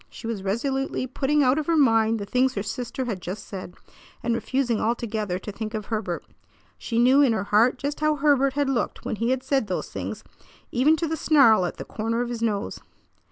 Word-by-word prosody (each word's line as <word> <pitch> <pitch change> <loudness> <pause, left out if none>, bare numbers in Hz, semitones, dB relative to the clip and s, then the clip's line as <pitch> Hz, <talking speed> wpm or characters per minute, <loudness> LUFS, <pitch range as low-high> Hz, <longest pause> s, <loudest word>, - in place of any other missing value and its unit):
She - - -11
was 225 -3 -3
resolutely 255 +7 -1
putting 280 +3 +1
out 260 +3 +3
of 305 - -4
her 335 -1 +2
mind 225 -5 +4
the 205 - -5
things 255 +5 +1
her 200 - -2
sister 245 +4 -4
had 205 -7 -4
just 185 +4 -6
said, 185 -2 -8 0.5
and 235 0 +1
refusing 245 -1 0
altogether 220 -4 -1
to 200 +3 -7
think 220 +2 -5
of 215 -1 -4
Herbert. 210 -6 -3 0.5
She 230 - -3
knew 255 +4 +5
in 265 -5 +4
her 215 - -1
heart 225 +6 +3
just 285 +3 -4
how 305 0 +2
Herbert 275 -2 +3
had 285 0 0
looked 270 -3 -2
when - - -2
he 230 +2 0
had 260 0 0
said 270 -6 0
those 185 - -3
things, - - -5 0.5
even 275 +6 +4
to 330 +1 -2
the 320 - -1
snarl 270 - +5
at - - -7
the - - -7
corner 225 +2 -2
of 240 - -5
his 235 -1 -4
nose. 215 -2 -1
235 Hz, 215 wpm, -25 LUFS, 215-270 Hz, 0.5 s, knew